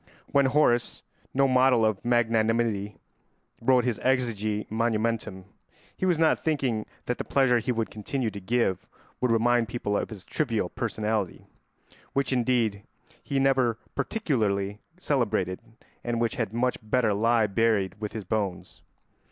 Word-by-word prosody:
When 140 -1 +4
Horace—no 130 0 +1
model 130 -3 +4
of 110 -3 0
magnanimity—wrote 115 +1 0
his 120 -4 -1
exegi 110 -5 0
monumentum, 110 -3 -1 0.5
he 185 - -1
was 175 -3 +3
not 160 0 +3
thinking 135 -9 0 0.2
that 125 - -2
the - - -1
pleasure 130 -3 +3
he 120 +3 -1
would 115 -2 -2
continue 110 +2 -3
to 100 - -7
give 110 -2 0 0.3
would 125 - +1
remind 115 +1 +3
people 105 -2 -2
of - - -1
his 105 -5 -10
trivial 115 -11 -1
personality, 110 -3 -2 0.7
which 140 -1 0
indeed 120 -5 +1 0.4
he 140 - -1
never 130 -4 +2 0.2
particularly 105 - -1 0.2
celebrated 110 - 0 0.4
and 120 -1 -1
which 115 -1 0
had 115 -4 -2
much 125 +2 0
better 110 0 +1
lie 115 +2 +3
buried 105 -2 +1
with 105 - -4
his 110 -1 -5
bones. 100 -2 -3
115 Hz, 135 wpm, -27 LUFS, 105-125 Hz, 0.7 s, When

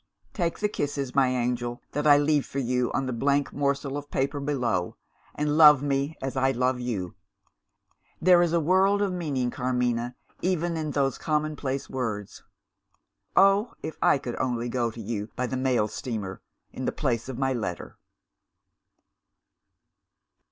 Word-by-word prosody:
"Take 170 -4 -1
the 210 - +1
kisses, 145 -8 -3
my 135 -1 +4
angel, 120 -1 -1
that 150 +1 -1
I 145 -1 +8
leave 145 -1 +2
for - - -8
you 125 -2 0
on 135 - -1
the 130 - -2
blank 140 +3 +1
morsel 140 0 -1
of 145 0 -7
paper 140 +2 -1
below, 125 -11 -1 0.4
and 150 +1 0
love 150 -3 +8
me 140 +2 -1
as 135 -1 -3
I 130 0 +2
love 125 +1 0
you. 105 -8 -3 1.1
There 180 0 +6
is 175 -2 +2
a 170 - +3
world 190 +5 +3
of 195 -2 -1
meaning, 140 -8 -1
Carmina, 125 -1 -1 0.3
even 175 -2 0
in 155 -1 -2
those 140 -2 0
commonplace 150 -3 -2
words. 110 -6 -4 0.9
Oh, 195 +4 +4
if 160 - -5
I - - +5
could 125 -3 -6
only 120 -1 -1
go 120 -1 0
to 115 - -10
you 105 -1 -4
by 125 - -1
the 130 - -3
mail 130 -4 +1
steamer, 105 -5 -5 0.3
in 130 - -5
the - - +1
place 125 -4 -2
of 130 - -5
my 135 0 +1
letter!" 100 -9 -5
135 Hz, 160 wpm, -26 LUFS, 125-150 Hz, 1.1 s, I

